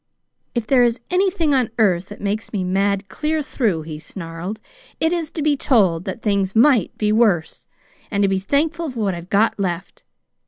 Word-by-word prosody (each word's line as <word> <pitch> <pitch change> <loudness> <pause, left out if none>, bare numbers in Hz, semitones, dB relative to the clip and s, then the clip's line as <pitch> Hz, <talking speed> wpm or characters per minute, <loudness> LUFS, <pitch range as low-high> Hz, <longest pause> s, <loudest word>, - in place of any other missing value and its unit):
"'If 235 -2 -1
there 255 +1 +4
is 240 0 +2
anything 360 -5 +2
on 255 -4 +2
earth 190 -5 +2
that 205 - -10
makes 205 +2 -3
me 200 -4 -2
mad 195 +2 0
clear 305 +9 -2
through,' 210 - -1
he 155 -1 -7
snarled, 170 +4 -7 0.4
'it 320 +2 +2
is 335 -3 -2
to 310 - -4
be 300 -1 +3
told 195 - +2
that 210 +4 -5
things 200 -2 0
might 240 - +4
be 210 -1 +1
worse, 210 -8 +1 0.4
and 200 -1 0
to - - +4
be 195 0 +1
thankful 310 - 0
for 250 -3 -7
what 200 -3 0
I've 170 +1 -8
got 210 +1 +2
left. 180 -1 -3
210 Hz, 190 wpm, -21 LUFS, 190-270 Hz, 0.4 s, there